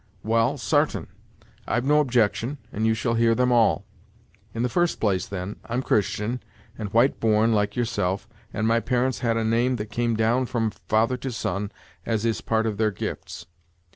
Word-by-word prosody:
"Well, 115 +5 +2
sartain; 115 - +1 0.6
I've 120 +2 0
no 150 +2 +4
objection, 125 0 +1
and 110 +2 0
you 110 - +3
shall 115 +1 -1
hear 115 0 +3
them 125 +1 +2
all. 115 -2 +3 0.7
In 115 - -2
the - - +2
first 175 +7 0
place, 95 -4 +1
then, 95 +1 -5
I'm 120 +3 -2
Christian, 105 +3 0 0.3
and 105 -3 -5
white 120 +5 +3
born, 110 0 +3
like 105 -1 +1
yourself, 115 -4 -1 0.2
and 110 +1 -1
my 115 +1 +3
parents 125 +2 0
had 115 -2 +1
a 115 - 0
name 120 +3 +2
that 105 -2 -6
came 115 +1 0
down 115 +4 +2
from 115 -3 0
father 115 +5 0
to 130 +1 -4
son, 100 -1 -3 0.3
as 115 -1 -1
is 115 -1 +1
a - - -14
part 110 0 +1
of 110 -2 -2
their 110 0 +2
gifts. 85 -3 -6
115 Hz, 185 wpm, -25 LUFS, 110-120 Hz, 0.7 s, no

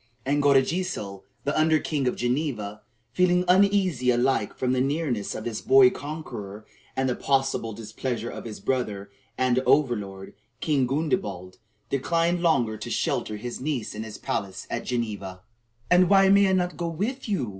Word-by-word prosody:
And 145 +2 +1
Godegesil, 140 - +1 0.2
the 145 - -1
under 155 0 +4
king 145 -3 -1
of 125 - 0
Geneva, 120 -5 -2 0.3
feeling 180 +1 +3
uneasy 185 -8 +3
alike 120 -3 +1
from 130 0 0
the 130 - +1
nearness 135 -6 -1
of - - -5
this 115 -3 -4
boy 130 -1 +6
conqueror 120 -9 -7 0.3
and 130 0 0
the 125 - 0
possible 135 -4 0
displeasure 115 +2 -4
of - - -8
his 110 -3 -7
brother 100 -4 -2 0.3
and 130 0 +2
over 130 0 +3
lord, 95 -2 -8 0.3
King 140 -5 +1
Gundebald, 135 - -2 0.3
declined 170 +5 +1
longer 120 -11 +2
to - - -7
shelter 105 - -1
his 120 +4 -6
niece 135 -5 -2
in 105 - -5
his 110 -1 -7
palace 95 -1 -4
at - - -3
Geneva. 105 -6 -3 0.5
"And 180 0 +5
why 195 -1 +6
may 200 0 +6
I - - +2
not 180 -1 0
go 170 - -2
with 215 +10 -3
you?" 145 - -1
130 Hz, 165 wpm, -25 LUFS, 110-160 Hz, 0.5 s, boy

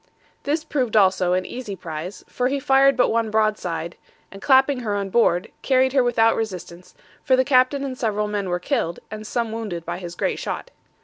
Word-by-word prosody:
This 305 +2 0
proved 255 -8 -1
also 185 -3 +3
an 185 0 0
easy 240 -5 -6
prize, 170 +1 -7
for 250 - -1
he 280 +2 -1
fired 270 -1 +4
but 250 - +3
one 225 -1 0
broadside, 210 -6 -1 0.3
and 195 - -11
clapping 265 +1 +4
her 215 -4 -2
on 200 -1 -3
board, 200 -4 +2
carried 260 -1 +2
her 265 -2 +4
without 225 -2 +3
resistance, 180 -5 -6 0.3
for 260 - +4
the 260 0 +2
captain 260 +1 +3
and 265 -2 -4
several 210 -4 -1
men 205 -2 -3
were 175 - 0
killed, 170 -1 -2
and 215 0 -7
some 235 -2 -2
wounded 205 -7 -5
by 175 +1 -4
his 175 -2 -7
great - - -1
shot. - - -5
220 Hz, 195 wpm, -22 LUFS, 185-255 Hz, 0.3 s, fired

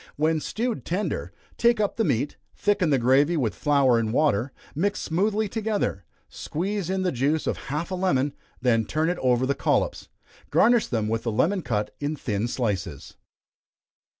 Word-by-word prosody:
When 155 +2 +1
stewed 230 +8 -3
tender, 185 +5 -2 0.3
take 235 -1 +4
up 205 -2 0
the 225 - +1
meat, 135 - 0 0.2
thicken 205 -5 +1
the 140 - +4
gravy 135 +7 +3
with 115 -9 0
flour 130 - +3
and 110 -1 -1
water, 130 -2 +2 0.2
mixed 200 +7 -1
smoothly 205 +6 0
together, 210 - -2 0.2
squeeze 190 +2 -3
in 190 0 0
the 180 - +1
juice 145 +5 0
of - - -1
half 150 +6 -3
a - - -1
lemon, 145 -7 +1 0.3
then 120 -3 +2
turn 155 +6 0
it 180 - -4
over 125 0 +2
the 140 - +1
collops. - - 0 0.4
Garnish 240 -1 +4
them 110 -3 -1
with 115 +1 -1
a - - +3
lemon 165 - +1
cut 105 -7 -2
in 145 +2 -2
thin 110 -5 -2
slices. 100 - -3
150 Hz, 170 wpm, -25 LUFS, 120-190 Hz, 0.4 s, take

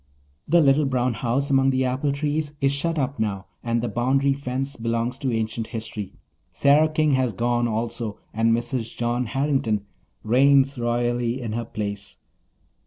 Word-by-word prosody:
The 170 +2 +5
little 145 0 +4
brown 125 -2 +1
house 125 +6 -1
among 135 0 +4
the 130 0 +1
apple 130 +3 0
trees 150 +1 -2
is 135 0 +2
shut 165 +4 -1
up 135 -2 -1
now 100 -3 -2 0.2
and 115 0 0
the - - 0
boundary 135 +5 +1
fence 135 0 -3
belongs 115 +1 -1
to 135 -3 -1
ancient 110 0 -2
history. 110 -3 -6 0.4
Sarah 150 +3 +4
King 155 -1 +2
has 130 -4 +1
gone 120 +3 +1
also 115 -1 -3 0.2
and 115 +1 +2
Mrs. 120 0 -2
John 120 +1 -1
Harrington 135 -6 0 0.4
reigns 135 +3 +4
royally 120 +1 0
in 115 -4 -4
her 115 +1 -2
place. 105 -3 -5
125 Hz, 160 wpm, -24 LUFS, 115-140 Hz, 0.4 s, The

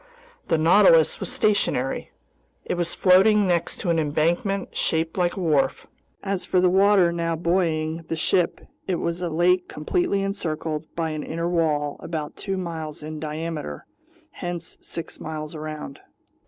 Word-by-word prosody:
The 165 - +2
Nautilus 165 0 +5
was - - -3
stationary. 205 - 0 0.6
It - - -1
was 175 -1 -1
floating 200 +3 +5
next 175 -2 0
to 175 - 0
an 165 - +2
embankment 170 +6 0
shaped 160 0 0
like 175 0 0
a - - -2
wharf. 145 -6 +1 0.4
As 195 -2 -2
for 185 - +1
the 180 0 +4
water 195 -2 +5
now 170 -1 -1
buoying 165 -1 0
the 165 - -2
ship, 175 +2 +1 0.3
it 185 - +1
was 170 +1 -2
a 175 - -1
lake 175 +3 +2
completely 200 - 0
encircled 160 -5 -3
by 165 -1 -1
an 155 -1 -3
inner 165 +2 -3
wall 155 -4 0
about 155 -3 -5
two 195 -2 -3
miles 160 -4 -5
in 155 0 -6
diameter, 155 - -5 0.5
hence 175 -2 -5
six 165 -1 -7
miles 155 0 -6
around. 155 -3 -7
165 Hz, 155 wpm, -24 LUFS, 155-180 Hz, 0.6 s, Nautilus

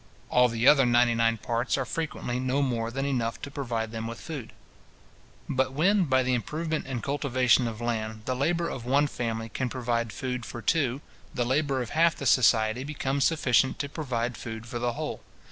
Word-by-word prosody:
All 125 0 +5
the 115 +1 0
other 140 -2 +7
ninety 120 0 +4
nine 115 0 +2
parts 120 +4 -1
are 135 - -1
frequently 125 -4 -3
no 130 +2 +1
more 115 -4 -1
than 135 +3 -3
enough 120 -5 -1
to 140 - -6
provide 115 -6 -3
them 115 0 -4
with 115 0 -6
food. 140 -9 -7 1.0
But 130 0 0
when, 185 +6 +3
by 130 -3 +3
the 125 0 +1
improvement 155 +6 -2
and 130 -4 -4
cultivation 130 -3 +2
of 115 -1 -5
land, 110 -2 -3
the 130 - -1
labour 165 +6 0
of 125 - -5
one 140 +4 +3
family 115 -5 -3
can 130 +2 -2
provide 120 -2 -1
food 125 +3 -4
for 120 - -7
two, 135 +2 +1 0.3
the 120 -2 0
labour 135 0 +1
of 115 - -9
half 165 +1 +3
the 140 - -6
society 115 -1 +4
becomes 140 -1 -1
sufficient 135 -5 +2
to 140 - -3
provide 125 -6 -3
food 110 -1 -7
for 120 +1 -5
the 120 0 0
whole. - - -4
125 Hz, 195 wpm, -27 LUFS, 115-140 Hz, 1.0 s, other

